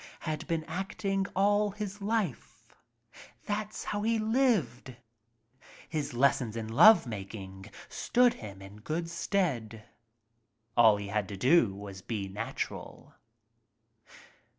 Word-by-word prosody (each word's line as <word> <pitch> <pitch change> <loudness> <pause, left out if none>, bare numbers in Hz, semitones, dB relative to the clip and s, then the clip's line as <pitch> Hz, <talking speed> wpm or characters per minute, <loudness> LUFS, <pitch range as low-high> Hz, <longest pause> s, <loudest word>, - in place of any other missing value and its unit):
Had 155 -1 -4
been 165 -2 -1
acting 195 +3 -2
all 205 +2 +3
his 205 0 -6
life. 205 - -3 0.7
That's 210 0 -3
how 205 - -3
he 225 +2 +1
lived. 215 - +1 0.9
His 150 -4 -3
les 140 +3 +4
sons 115 -4 -5
in 110 -1 -4
love 215 - +7
making 95 -2 -8 0.2
stood 245 0 +2
him 100 -3 -10
in 100 +2 -12
good 155 +10 -3
stead. 125 - -2 0.9
All 110 -3 +6
he 100 0 -6
had 105 -1 -1
to 100 - -7
do 125 - +4
was 100 -1 -9
be 100 -2 -4
natural. 95 +1 -6
150 Hz, 120 wpm, -30 LUFS, -, 0.9 s, love